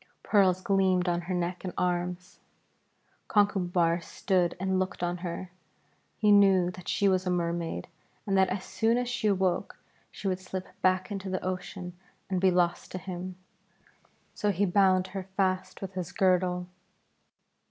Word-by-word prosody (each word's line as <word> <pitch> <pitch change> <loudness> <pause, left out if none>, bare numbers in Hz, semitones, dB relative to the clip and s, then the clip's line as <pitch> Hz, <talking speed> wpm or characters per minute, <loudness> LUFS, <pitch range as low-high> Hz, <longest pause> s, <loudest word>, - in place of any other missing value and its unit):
Pearls 190 -3 +3
gleamed 190 -2 +2
on 175 0 +1
her 180 +2 -4
neck 175 +1 -2
and 180 -2 -5
arms. 180 0 -2 0.9
Conchubar 180 -5 +2
stood 180 0 0
and 190 0 0
looked 185 -1 -2
on 175 0 -1
her. 180 +1 -5 0.7
He 210 -1 +4
knew 195 -3 +5
that 180 0 -12
she 200 - +2
was 185 -1 +2
a - - +2
Mermaid 170 - -2 0.4
and 195 - 0
that 190 -1 +4
as 190 0 -3
soon 230 +1 +1
as 245 0 -1
she 240 -3 -1
awoke 190 -3 0 0.3
she 200 - -6
would 185 -1 0
slip 185 0 -5 0.2
back 185 +2 +2
into 195 -1 -4
the 185 -1 -3
ocean 180 0 -4 0.4
and 185 -1 0
be 190 - +5
lost 175 -1 +1
to - - -2
him. 185 0 -6 1.0
So 210 - 0
he 200 +1 +2
bound 185 -1 +3
her 190 -2 -5
fast 185 0 0
with 190 0 -6
his 185 -3 -4
girdle. 180 -3 +2
185 Hz, 160 wpm, -29 LUFS, 180-195 Hz, 1.0 s, knew